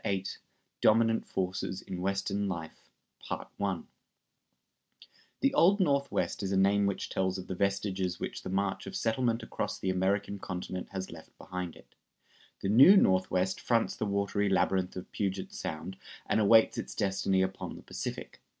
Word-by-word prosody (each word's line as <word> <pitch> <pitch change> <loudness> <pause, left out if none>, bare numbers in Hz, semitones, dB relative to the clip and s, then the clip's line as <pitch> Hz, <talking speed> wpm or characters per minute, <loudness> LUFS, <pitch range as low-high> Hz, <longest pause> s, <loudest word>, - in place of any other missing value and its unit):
] - - -32
VIII 95 -1 -1 0.6
DOMINANT 115 +1 +4
FORCES 95 0 -3
IN 90 -1 -6
WESTERN 100 +1 -1
LIFE[222:1] 90 +2 -6 1.6
The 275 0 +3
Old 200 -4 +5
Northwest 140 - +1
is 95 -1 -2
a 95 - +2
name 100 +1 +4
which 100 - -2
tells 95 0 -1
of 95 - -6
the - - -4
vestiges 95 -1 -1
which - - -4
the - - -6
march 95 +1 -1
of 95 - -6
settlement 115 +3 0
across - - -3
the 95 - -1
American 100 +2 0
continent 90 0 -5
has 95 -1 -5
left 80 -1 -13
behind 90 -2 -5
it. - - -18 0.7
The 95 - -1
New 135 - +8
Northwest 95 - +2
fronts 115 -2 +1
the 110 - -2
watery 100 0 0
labyrinth 95 0 +1
of 90 - -7
Puget 95 -2 -3
Sound 85 +5 -5 0.3
and 110 - +1
awaits 110 +1 +5
its - - -6
destiny 95 -2 +1
upon 95 +1 -4
the - - -12
Pacific. - - -6
95 Hz, 155 wpm, -30 LUFS, 95-100 Hz, 1.6 s, New